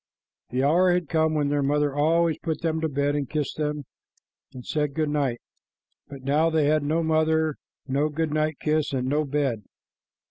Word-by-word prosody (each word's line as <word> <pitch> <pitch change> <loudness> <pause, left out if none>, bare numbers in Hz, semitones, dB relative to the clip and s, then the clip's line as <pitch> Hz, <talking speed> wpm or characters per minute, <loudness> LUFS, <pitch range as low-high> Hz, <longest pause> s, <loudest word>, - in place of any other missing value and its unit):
The 130 +2 -1
hour 175 +6 +4
had 175 -3 0
come 160 -1 +1
when 145 -2 +1
their 145 0 +1
mother 145 +1 +1
always 165 +2 +2
put 160 -2 -3
them 160 -1 -1
to 160 - 0
bed 145 +1 0
and 145 -3 -2
kissed 150 -3 -2
them 150 -2 -2 0.7
and 125 -1 -10
said 150 -2 -1
good 155 -2 0
night, 135 -5 0 0.7
but 140 -2 -10
now 150 +4 +2
they 160 -2 +2
had 155 +1 +3
no 155 +3 0
mother, 160 -1 +1 0.3
no 140 +3 +1
good 155 0 -2
night 155 -1 0
kiss, 155 -2 0
and 130 -1 -1
no 150 +3 +1
bed. 135 -6 -1
150 Hz, 185 wpm, -25 LUFS, 140-160 Hz, 0.7 s, hour